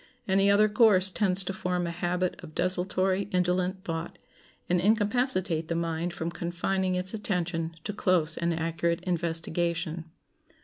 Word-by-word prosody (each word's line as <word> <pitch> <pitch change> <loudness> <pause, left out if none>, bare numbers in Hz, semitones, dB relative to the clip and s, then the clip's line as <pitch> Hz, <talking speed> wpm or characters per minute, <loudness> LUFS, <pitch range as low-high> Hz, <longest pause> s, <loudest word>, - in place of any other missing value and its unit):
Any 195 +1 +3
other 205 +1 +5
course 205 -3 +4
tends 190 -2 +4
to 195 - -3
form 180 -1 -2
a 170 - -3
habit 175 +2 -2
of 155 -2 -11
desultory, 185 +1 0
indolent 180 0 0
thought, 165 0 -5 0.5
and 175 0 +1
incapacitate 205 - +1
the 170 - -2
mind 165 +1 -2
from 170 -2 -4
confining 180 +2 -2
its 180 +2 +1
attention 175 -6 -2
to 210 - -4
close 175 -6 +1
and 170 0 -1
accurate 165 +1 -1
investigation. 170 -1 -2
180 Hz, 140 wpm, -28 LUFS, 170-190 Hz, 0.5 s, other